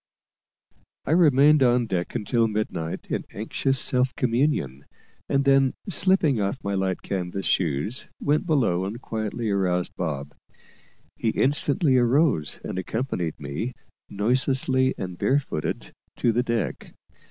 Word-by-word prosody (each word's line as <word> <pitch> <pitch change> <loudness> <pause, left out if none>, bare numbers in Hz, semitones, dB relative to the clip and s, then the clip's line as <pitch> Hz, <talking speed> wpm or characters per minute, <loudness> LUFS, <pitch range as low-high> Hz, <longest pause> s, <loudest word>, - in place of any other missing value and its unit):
I - - -2
remained 150 -3 +5
on 125 -1 +4
deck 90 -5 -3
until 115 +2 +1
midnight, 105 -7 -3
in - - -1
anxious 130 +6 -1
self 125 +1 +1
communion; 115 - 0 0.4
and 140 0 +2
then, 135 -1 +4
slipping 165 - +2
off 100 0 -1
my 100 - -2
light 95 -1 -1
canvas 95 0 -3
shoes, 85 - -1
went 150 +4 0
below 120 - +2
and 105 +5 -5
quietly 110 -1 -3
aroused 90 -3 0
Bob. 75 -5 -4 0.8
He 115 - 0
instantly 140 +2 +2
arose, 125 - +2
and 95 - -4
accompanied 95 - -3
me, 75 - -4 0.4
noiselessly 130 +4 +1
and 90 -2 -6
bare 135 - +3
footed, 130 - -4 0.2
to 120 - +2
the 120 +2 +1
deck. 120 -3 -3
115 Hz, 130 wpm, -25 LUFS, 95-135 Hz, 0.8 s, remained